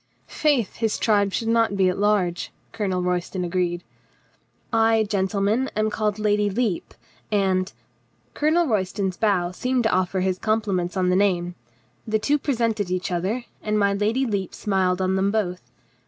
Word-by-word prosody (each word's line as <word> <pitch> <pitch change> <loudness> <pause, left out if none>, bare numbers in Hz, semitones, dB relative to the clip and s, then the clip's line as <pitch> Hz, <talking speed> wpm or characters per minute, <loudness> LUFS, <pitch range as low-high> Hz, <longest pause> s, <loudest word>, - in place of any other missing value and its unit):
"Faith, 280 -9 0
his 225 -2 0
tribe 205 -3 +2
should 225 +3 -2
not 225 -3 +2
be 190 -1 +4
at 180 - +1
large," 200 -4 +1 0.2
Colonel 190 -5 -1
Royston 180 +1 -1
agreed. 175 0 -1 0.9
"I, 225 0 +4
gentlemen, 205 +4 0
am 215 0 +1
called 210 -1 -1
my 215 - -6
Lady 210 -1 +2
Lepe, 205 -3 -2 0.4
and 190 -2 +1 0.2
— - - -41
" - - -40
Colonel 315 +3 +2
Royston's 195 - -1
bow 185 -5 +1
seemed 250 +6 -1
to 220 - +2
offer 185 +1 +1
his 185 0 0
compli 215 -2 0
ments 180 +1 -2
on 180 -1 +2
the 180 - +3
name. 180 -3 +1 0.5
The 220 0 +2
two 290 +7 +1
presented 230 -8 -1
each 180 0 -2
other, 195 +8 -1 0.2
and 215 0 -1
my 200 -1 +3
Lady 220 +6 +1
Lepe 200 -6 -3
smiled 190 -2 0
on 185 0 +1
them 195 +1 +2
both. 190 -4 -1
200 Hz, 170 wpm, -23 LUFS, 185-220 Hz, 0.9 s, be